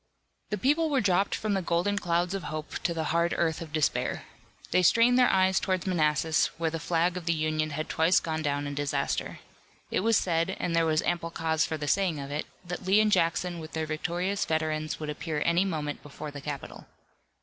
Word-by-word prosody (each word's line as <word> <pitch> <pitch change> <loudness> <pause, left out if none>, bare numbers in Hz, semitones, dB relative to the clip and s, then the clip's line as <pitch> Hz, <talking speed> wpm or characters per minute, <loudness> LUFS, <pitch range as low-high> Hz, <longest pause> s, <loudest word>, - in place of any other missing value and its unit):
The 210 - -1
people 300 - +2
were 280 -3 +2
dropped 195 -2 +2
from 215 -1 -2
the 195 - +1
golden 180 +4 0
clouds 175 +1 0
of 195 -2 -4
hope 155 0 -5
to 175 - -1
the 165 -1 -2
hard 170 +1 +2
earth 165 -1 0
of 160 -2 -7
despair. 155 -2 0 0.5
They 185 - +4
strained 235 +7 +5
their 250 - +5
eyes 190 0 +3
toward 185 -2 -1
Manassas, 155 -3 +2
where 165 -1 -1
the 165 - -3
flag 170 +3 +1
of 175 -2 -7
the 170 - +3
Union 155 0 0
had 155 +1 -4
twice 165 +3 +3
gone 160 -1 -3
down 145 -1 -1
in 145 - -4
disaster. 145 0 -2 0.5
It - - +1
was 225 +2 +3
said, 170 +1 0
and 170 - -1
there 165 -1 +3
was 155 -1 +2
ample 170 -1 -1
cause 160 -1 0
for 160 - -3
the 150 -1 -4
saying 180 -2 +1
of 140 0 -6
it, 150 +1 -3 0.2
that 180 +2 -5
Lee 190 +3 +4
and 215 -1 +3
Jackson 175 -1 +1
with 160 0 -9
their 160 0 -1
victorious 175 +5 -1
veterans 155 -1 -1
would 155 -1 -3
appear 150 0 -3
any 170 +3 +3
moment 150 -5 -3
before 145 +1 -8
the 145 -1 -8
capital. 140 -1 -7
165 Hz, 215 wpm, -28 LUFS, 155-185 Hz, 0.5 s, strained